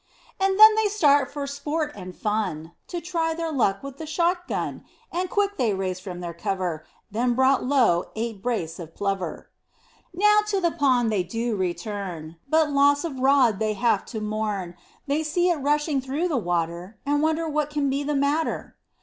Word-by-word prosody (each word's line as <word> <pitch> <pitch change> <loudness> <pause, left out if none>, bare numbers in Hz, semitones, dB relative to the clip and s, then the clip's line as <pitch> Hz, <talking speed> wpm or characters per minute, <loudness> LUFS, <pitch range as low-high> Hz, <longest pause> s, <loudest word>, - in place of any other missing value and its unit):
And 385 +1 +1
then 435 0 +10
they 435 0 +2
start 290 -9 +3
for 285 -1 -4
sport 295 +2 -3
and 185 -2 -9
fun, 195 -7 -2 0.2
To 350 - -4
try 330 -1 -1
their 330 -1 -3
luck 215 -8 +1
with 275 -1 -8
the 315 - -7
shot 350 +3 0
gun, - - -3 0.3
And 360 +1 -2
quick 405 0 0
they 220 -5 +1
raised 185 -1 -3
from 180 -2 -7
their 170 -1 -5
cover, 170 -2 -3 0.2
Then 240 +3 +1
brought 265 +1 +3
low 245 -11 +3
eight 225 -2 -4
brace 185 -9 -2
of 165 -2 -9
plover. 195 -2 -3 0.6
Now 420 +4 +4
to 405 -2 +1
the 340 -2 +1
pond 250 -6 +2
they 205 -3 +1
do 225 +6 -2
return, 180 -3 -4
But 315 -1 +3
loss 285 0 +4
of 290 -6 -4
rod 260 -6 +4
they 215 -1 0
have 235 +3 +1
to 220 - -5
mourn, 210 -4 -3 0.3
They 290 +2 0
see 345 +4 +1
it 340 - 0
rushing 295 0 +1
through 285 +7 -2
the 310 - 0
water, 175 0 -2
And 290 +1 +1
wonder 320 +1 +1
what 300 -1 -1
can 295 -1 -1
be 275 +1 0
the 295 +1 -1
matter. 285 +3 -1
270 Hz, 185 wpm, -25 LUFS, 200-315 Hz, 0.6 s, then